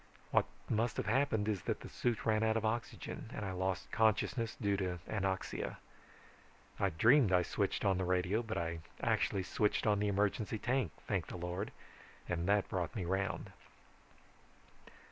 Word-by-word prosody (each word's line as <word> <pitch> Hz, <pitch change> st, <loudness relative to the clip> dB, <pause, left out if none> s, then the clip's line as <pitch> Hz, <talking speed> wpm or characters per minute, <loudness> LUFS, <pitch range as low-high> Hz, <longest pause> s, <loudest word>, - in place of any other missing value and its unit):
What -, -, +4 dB, 0.2 s
must 115 Hz, +2 st, 0 dB
have -, -, -1 dB
happened 110 Hz, -2 st, +2 dB
is 105 Hz, -4 st, 0 dB
that -, -, -1 dB
the -, -, -7 dB
suit 120 Hz, -3 st, -1 dB
ran 110 Hz, -1 st, +3 dB
out 110 Hz, 0 st, +3 dB
of 110 Hz, -, -1 dB
oxygen, 115 Hz, 0 st, -3 dB
and 105 Hz, -, -3 dB
I 95 Hz, -, -2 dB
lost 95 Hz, 0 st, -2 dB
consciousness 110 Hz, +2 st, +2 dB
due 100 Hz, -4 st, +2 dB
to 90 Hz, -2 st, -1 dB
anoxia. 95 Hz, -3 st, -2 dB, 1.0 s
I 100 Hz, -, +3 dB
dreamed 115 Hz, -, +5 dB
I 90 Hz, -1 st, +5 dB
switched -, -, -1 dB
on 95 Hz, -2 st, +3 dB
the -, -, +1 dB
radio, 90 Hz, +4 st, +1 dB
but 110 Hz, -2 st, -4 dB
I 85 Hz, 0 st, -2 dB, 0.2 s
actually 95 Hz, -, +2 dB
switched 105 Hz, +3 st, +1 dB
on 105 Hz, -2 st, +3 dB
the 105 Hz, -, +1 dB
emergency 105 Hz, +2 st, +1 dB
tank, 125 Hz, -, 0 dB, 0.2 s
thank -, -, 0 dB
the -, -, -6 dB
Lord, 90 Hz, +4 st, -3 dB, 0.6 s
and 90 Hz, 0 st, -1 dB
that 100 Hz, 0 st, +3 dB
brought 90 Hz, -3 st, -2 dB
me 95 Hz, -5 st, -2 dB
round. 95 Hz, +2 st, -1 dB
100 Hz, 165 wpm, -35 LUFS, 95-110 Hz, 1.0 s, dreamed